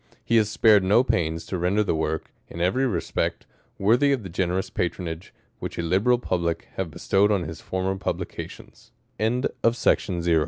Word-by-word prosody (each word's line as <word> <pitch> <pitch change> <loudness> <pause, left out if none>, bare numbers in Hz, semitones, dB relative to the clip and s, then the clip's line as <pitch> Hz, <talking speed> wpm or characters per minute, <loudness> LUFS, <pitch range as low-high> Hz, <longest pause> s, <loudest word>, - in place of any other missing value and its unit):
He 115 - +3
has 105 -2 +3
spared 105 -2 +5
no 105 +6 +4
pains 80 -8 -1
to 95 - -3
render 95 +5 +2
the 100 - 0
Work, 80 0 -2 0.2
in 85 - -9
every 110 +10 +2
respect, 90 -9 -2 0.3
worthy 120 +8 +4
Jfthe 100 -7 -9
generous 90 +1 -1
patronage, 85 0 -3 0.3
which - - -6
a 85 - -1
liberal 100 +9 +3
public 85 -7 -2
have 95 -3 -3
'^estowed 95 +6 +2
on 100 -4 +1
his 80 0 -7
former 95 +1 -2
pub 95 - -2
95 Hz, 150 wpm, -25 LUFS, 85-105 Hz, 0.3 s, spared